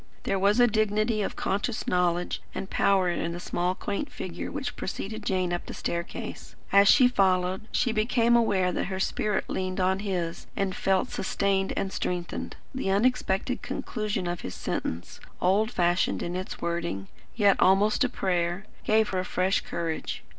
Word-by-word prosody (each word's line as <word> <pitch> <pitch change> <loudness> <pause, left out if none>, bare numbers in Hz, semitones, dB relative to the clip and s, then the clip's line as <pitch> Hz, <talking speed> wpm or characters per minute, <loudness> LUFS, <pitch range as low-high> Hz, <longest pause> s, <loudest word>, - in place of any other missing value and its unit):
There 195 - 0
was 200 +4 +3
a 245 - +8
dignity 215 0 +1
of - - -2
conscious 205 +4 -1
knowledge 180 -1 0
and 195 - -5
power 195 -2 +3
in 170 -1 -1
the 175 - -5
small 180 +1 -1
quaint 205 +9 -3
figure 175 -2 -5
which 275 -3 -4
preceded 215 +3 -5
Jane 185 -3 0
up 175 - -3
the - - -6
staircase. 170 +1 -5 0.2
As 200 0 +6
she 255 +3 +7
followed, 190 -3 +1
she 245 - +1
became 230 +2 +3
aware 195 -6 +3
that - - -1
her 190 0 -4
spirit 210 +1 0
leaned 185 0 -2
on 190 +1 +2
his 180 -5 -3
and 195 -2 -1
felt 190 -1 +1
sustained 195 0 0
and 190 - -1
strengthened. 175 -1 -3 0.2
The 260 -7 -2
unexpected 240 +2 +1
conclusion 215 -5 -3
of 175 0 -3
his 90 - -6
sentence, 85 +2 -4 0.2
old 200 +4 +3
fashioned 175 -5 +1
in 175 +1 -3
its 185 +1 -5
wording, 170 - -2 0.3
yet 205 -3 +4
almost 200 +6 +4
a 255 - +1
prayer, 180 -2 -1 0.2
gave 215 0 +3
her 185 -1 -1
fresh 185 +1 +1
courage. 165 -2 -4
190 Hz, 165 wpm, -27 LUFS, 180-215 Hz, 0.3 s, a